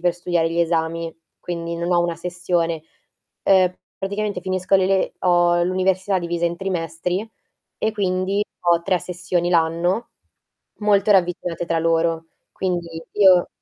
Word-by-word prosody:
per 175 0 +1
studiare 175 -2 0
gli 165 - -2
esami, 165 0 -1 0.2
quindi 170 -1 -4
non 170 +1 -1
ho 175 - +4
una 170 -1 -1
sessione. 170 -2 -2 0.6
Uhm, 185 -2 +4 0.2
praticamente 205 +2 -2
finisco 185 0 0
le 190 -1 +2
le 190 0 +1
ho 175 -1 +3
l'università 185 +1 +1
divisa 170 -1 -2
in 170 0 -3
trimestri, 180 +1 -2 0.5
e 220 - 0
quindi 195 0 0 0.2
ho 170 -1 +4
3 180 +1 +1
sessioni 175 0 -2
l'anno, 170 +6 +1 0.7
molto 210 0 +3
ravvicinate 175 -2 0
tra 165 -1 0
loro. 165 0 +1 0.3
Quindi 180 -2 -2 0.3
io 190 -4 +5
175 Hz, 135 wpm, -22 LUFS, 170-185 Hz, 0.7 s, io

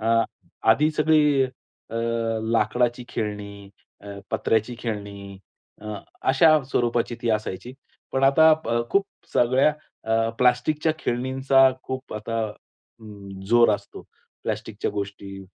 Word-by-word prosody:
अ, 115 +1 +3 0.5
आधी 150 +7 +4
सगळी 150 -2 +3 0.5
अ, 115 - -7 0.6
लाकडाची 120 +2 +1
खेळणी, 100 -2 -5 0.3
अ, 100 0 -9
पत्र्याची 110 +2 0
खेळणी 100 -4 -6 0.4
अ, 105 0 -6 0.4
अशा 135 +5 +5 0.2
स्वरूपाची 120 -2 0
ती 120 - -1
असायची. 110 +2 -3 0.4
पण 135 - 0
आता 160 +4 +6
प - - -6 0.2
खूप 200 0 +2 0.3
सगळ्या 130 +5 +3 0.3
अ, 115 0 +1
प्लास्टिकच्या 125 +6 +2
खेळणींचा 130 +1 +3
खूप 130 0 -6
आता 115 +2 -3 0.6
अं, 100 -3 -11
जोर 120 -1 +5
असतो. - - -9 0.4
प्लास्टिकच्या - - -3
गोष्टी 100 -1 -6
115 Hz, 110 wpm, -24 LUFS, 105-130 Hz, 0.6 s, आता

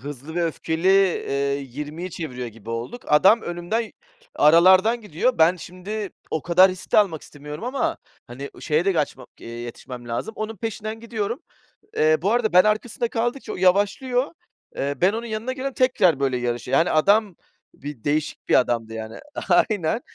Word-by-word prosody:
"Hızlı 145 +2 -8
ve 175 -1 +1
Öfkeli" 160 +2 -1
eee, 140 -8 +2
20'yi 150 +7 -6
çeviriyor 125 -7 -5
gibi 115 0 -11
olduk. 120 - -5
Adam 190 +10 +5
önümden 175 +7 -3 0.4
aralardan 185 +9 +5
gidiyor. 215 +5 -1
Ben 165 +3 +5
şimdi 185 +4 -6 0.2
o 160 - -2
kadar 180 +2 +6
riskte 185 +3 0
almak 185 -8 +2
istemiyorum 150 +5 -9
ama, 280 +6 -1 0.3
hani, 135 +4 -8
şeye 155 +1 +1
de 195 - +3
gaçma 145 -6 -2
eee, - - -10
yetişmem 120 +1 -8
lazım. 120 - -3
Onun 215 +1 -4
peşinden 220 +1 -5
gidiyorum. 230 - -4 0.6
Eee, 155 0 +4
bu 195 +4 +1
arada 235 -3 +1
ben 180 0 +8
arkasında 220 +2 0
kaldıkça 240 +4 -2
o - - -5
yavaşlıyor. 205 +8 +2 0.4
Eee, 140 +1 -2
ben 190 +3 +4
onun 230 +1 -4
yanına 225 +3 -3
geliyorum 265 +1 -4
tekrar 205 - +3
böyle 135 -2 +1
yarışıyor. 120 +2 -1
Yani, 165 - +3
adam 200 +4 +3 0.4
bir 140 -5 -9
değişik 150 +1 -2
bir - - +5
adamdı, 115 -3 -1
yani. 110 0 -7 0.3
Aynen. 185 +3 +2
175 Hz, 160 wpm, -23 LUFS, 145-215 Hz, 0.6 s, ben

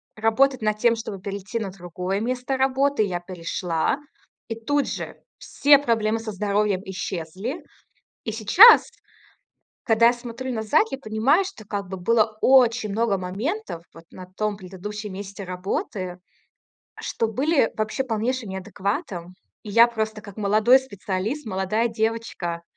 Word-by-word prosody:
работать 235 +4 +2
над 215 -1 0
тем, 235 +1 +4
чтобы 215 -3 -6
перейти 200 +3 -4
на 210 -3 -3
другое 185 +1 -4
место 250 +3 -2
работы. 270 -1 +2
Я 180 -4 -2
перешла- 175 0 -2 0.5
и 225 - -4
тут 290 +5 0
же - - -6 0.2
все 285 0 +4
проблемы 225 -5 0
со 225 -1 -5
здоровьем 205 -1 0
исчезли. 190 - -5 0.6
И 220 - -3
сейчас, 225 - +7 0.9
когда 230 0 +5
я 240 - +4
смотрю 240 +1 -6
назад, 230 - +2
я - - -3
понимаю, 265 - +2
что 310 - -9
как 200 -2 -4
бы 190 - -6
было 215 +3 +1
очень 245 -4 +4
много 215 -1 +1
моментов 200 - -4
вот 165 - -13
на 185 - -10
том 205 +3 -3
предыдущем 200 +2 -7
месте 200 +1 -7
работы, 185 0 -4 0.8
что 225 - -2
были 270 +3 +2
вообще 215 +5 -1
полнейшим 240 0 -2
неадекватом. 190 - -4 0.3
И 210 - -8
я 230 +3 +7
просто, 220 -2 -3
как 200 -2 -12
молодой 215 +4 +5
специалист, 210 +3 -4
молодая 195 +3 0
девочка, 220 -7 -2
215 Hz, 140 wpm, -24 LUFS, 190-240 Hz, 0.9 s, сейчас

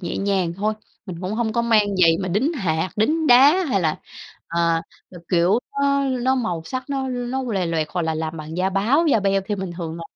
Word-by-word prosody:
nhẹ 175 - -4
nhàng 195 -4 0
thôi. 210 +3 -1 0.3
Mình 175 -3 -7
cũng 185 +2 -4
hông 225 -1 -1
có 235 - 0
mang 210 -4 +2
giày 165 -1 +5
mà 185 - -3
đính 215 - 0
hạt, 175 - -1
đính 310 +9 +1
đá 290 +9 +6
hay 225 -10 0
là, 160 -3 0 0.5
à, 170 -1 +1 0.3
ờ, 180 - -11
kiểu, 180 +5 +3 0.2
nó 280 0 +2
nó 260 0 +1
màu 180 -11 -2
sắc 255 +9 -5
nó 270 -1 -2
nó 250 +1 -3
lòe 200 -8 -1
loẹt, 160 -2 -1
hoặc 175 +1 -2
là 160 0 -1
làm 160 +1 -4
bằng 155 +1 -7
da 185 +1 0
báo, 235 - +2
da 275 -8 +3
beo 195 0 +1
thì 210 - -1
mình 190 -2 -5
thường 165 -2 -5
là 170 - -7
195 Hz, 230 wpm, -22 LUFS, 170-250 Hz, 0.5 s, đá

